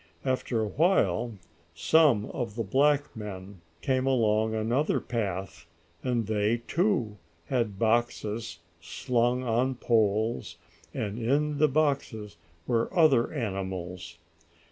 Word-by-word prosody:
After 130 -3 0
a 110 - -1
while 115 - +1 0.4
some 135 - +3
other 115 -2 -3
black 145 +7 +2
men 100 -3 -8 0.2
came 130 0 0
along 110 -3 +2
another 120 +7 +1
path, 95 -6 -4 0.3
and 120 -3 -1
they, 110 +2 0
too, 165 - 0 0.3
had 115 -6 -1
boxes 115 -3 -1 0.2
slung 120 +8 0
on 125 +2 +1
poles, 110 -5 0 0.3
and 110 -4 -4
in 145 +5 0
the 155 - +5
boxes 135 - -1 0.3
were 115 -1 0
other 140 -8 +4
animals. 95 - -5
115 Hz, 105 wpm, -28 LUFS, 105-130 Hz, 0.4 s, the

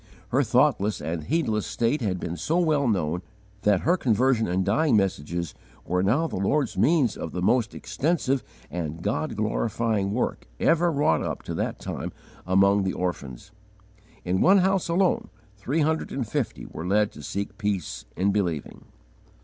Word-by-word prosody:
Her - - +3
thoughtless 105 +2 +2
and 80 0 -4
heedless 125 -10 0
state 120 +5 0
had 95 -5 -1
been 85 0 -4
so 160 - 0
well 155 -6 +2
known 90 -5 0 0.4
that 105 -3 +3
her 175 +3 +3
conversion 125 - +2
and 90 +1 0
dying 115 +4 +3
messages 85 -4 -1 0.3
were 90 +1 0
now 120 - +2
the 160 - -4
Lord's 130 +8 +1
means 145 -9 +3
of - - -6
the 90 - -3
most 120 +3 +2
extensive 140 -4 0 0.3
and 85 -1 -4
God 110 +7 -1
glorifying 110 -1 0
work 120 +4 -2
ever 170 +1 +3
wrought 140 - +2
up - - -4
to - - -5
that - - -2
time - - -5 0.4
among 100 +2 +4
the 95 -1 -1
orphans. 70 -9 -4 0.7
In 90 +1 +1
one 195 +2 +6
house 190 -1 +2
alone 180 +2 +1 0.3
three 130 +10 -1
hundred 160 +1 0
and 130 -5 -3
fifty - - -3
were 85 - -6
led 105 +2 +2
to - - -11
seek 100 +3 -5
peace 100 - -2
in 100 +2 +2
believing. 90 -8 -2
105 Hz, 165 wpm, -26 LUFS, 90-145 Hz, 0.7 s, one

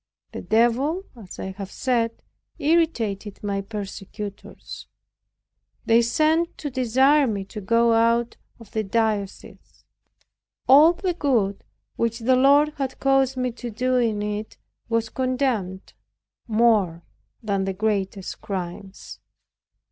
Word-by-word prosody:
The - - -6
Devil, 250 - +1
as 210 -6 -11
I 190 - -5
have 195 0 -8
said, 230 -3 -1 0.3
irritated 230 - 0
my 200 -1 -1
persecutors. 200 0 -8 1.0
They 230 +1 +5
sent 310 +8 +1
to 290 - -5
desire 260 +3 +3
me 200 -4 -3
to 210 +2 -8
go 230 +3 +3
out 230 +1 +2 0.2
of 230 -3 -15
the 220 - -1
diocese. 210 -1 -3 0.8
All 300 +6 +7
the 360 +1 -2
good 235 - 0 0.3
which 230 0 0
the 255 +2 +2
Lord 280 +3 +5
had 270 -2 -4
caused 270 -1 +2
me 250 -1 -1
to 240 +1 -7
do 255 +3 0
in 220 -4 0
it 210 +1 -5 0.3
was 230 -1 0
condemned, 250 -8 -2 0.5
more 215 -7 +2 0.4
than 200 -3 -1
the 195 - -2
greatest 195 -1 -2
crimes. 190 0 -7
230 Hz, 120 wpm, -23 LUFS, 205-260 Hz, 1.0 s, All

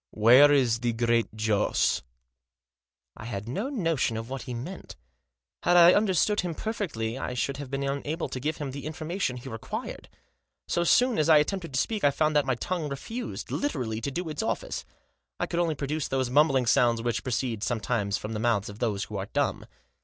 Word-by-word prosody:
" - - -65 0.2
Where 135 +5 +8
is 125 -5 +3
the 120 0 0
Great 115 -1 +1
Joss? 110 -1 +1 0.6
" 65 - -65 0.5
I 110 - -10
had 105 -2 -5
no 200 - -2
notion 165 - 0
what 130 +2 -6
he 125 - -6
meant. 155 +11 -7 0.7
Had 175 0 +4
I 175 +1 +9
under 205 -3 +2
stood 210 +5 +2
him 175 -2 -4
perfectly 140 - -3
I 125 - -4
should 140 +3 -1
have 140 -2 -7
been 135 +1 -2
unable 140 +4 -2
to 130 - -4
give 150 +4 -2
him 145 -3 -4
the 140 +2 -6
information 160 -3 -3
he 125 - -9
required. 115 -3 -6 0.6
So 170 - +1
soon 245 +5 +3
as 155 - +2
I 155 - +8
attempted 165 -1 -1
to - - +2
speak 215 +5 -1
I 145 - +6
found 155 +2 0
that 145 -2 +3
my 130 - +2
tongue 160 +4 -3
refused, 225 - -6
literally, 115 - -2
to 130 - -2
do 175 +5 -4
its 155 - -3
office. 220 - -3 0.5
I - - +1
could 170 - -2
only 165 -3 +1
produce 145 +2 -2
those 130 -2 -1
mumbling 135 -2 +4
sounds 115 0 +3
which 120 -2 -1
proceed, 120 -3 -2
sometimes, 110 -3 -1
from 105 +1 -6
the 105 - -3
mouths 110 -3 +1
of 105 +1 -10
those 105 -4 -1
who 105 - -6
are 95 0 -4
dumb. - - -1
135 Hz, 205 wpm, -27 LUFS, 115-165 Hz, 0.7 s, I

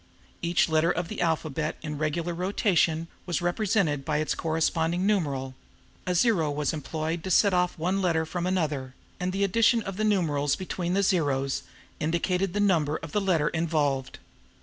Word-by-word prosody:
Each 170 0 +2
letter 160 +1 +2
of 175 -1 -1
the - - -4
alphabet 155 -2 -1
in 150 -2 -4
regular 160 +3 -1
rotation 170 -3 +1 0.2
was 175 - 0
represented 175 -5 0
by 150 +1 0
its 155 0 0
corresponding 165 +2 0
numeral; 140 -10 0 0.5
a 180 - +1
zero 175 -6 +3
was 145 0 -1
employed 160 +2 -3
to 190 - -4
set 200 +2 +4
off 180 0 +1
one 185 +4 0
letter 165 -3 +1
from 175 +2 -3
another, 150 -8 -1 0.2
and 180 0 -1
the 195 +2 0
addition 230 +3 +3
of 195 -2 -6
the 215 - 0
numerals 150 -9 +1
between 180 -1 -3
the 200 - +2
zeros 140 -8 +1 0.4
indicated 175 +4 0
the 205 - -1
number 165 -7 +2
of 165 - -9
the 210 - +1
letter 170 -6 +2
involved. 150 -5 -1
170 Hz, 170 wpm, -27 LUFS, 155-185 Hz, 0.5 s, set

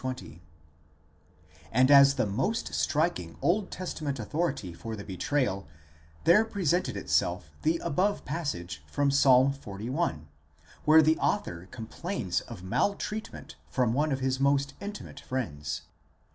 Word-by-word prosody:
Acts 130 - -3
i, - - +1
20); 75 +6 -13 1.3
and 130 +4 +4
as 140 0 +8
the 130 - +1
most 135 - -1
striking 140 - 0
Old 190 +3 +1
Testament 155 -6 -4
authority 135 - -2
for 110 +6 -6
the 100 - -7
betrayal, 100 - -1 0.6
there 190 +6 +6
presented 185 -5 0
itself 75 - 0
the 165 +2 +2
above 200 +7 0
passage 90 - -4
from 145 -1 +1
Ps. 140 - +4
xli., 130 - +2 0.6
where 155 +1 +7
the 155 +1 +3
author 90 - -1
com 115 - -7
plains 115 - -2
of 105 -7 -9
maltreatment 200 - -2
from 125 -3 +1
one 150 +4 +1
of 135 -1 -1
his 130 0 0
most 140 0 +2
intimate 205 +1 -7
friends. 80 - -4
140 Hz, 135 wpm, -29 LUFS, 105-165 Hz, 1.3 s, as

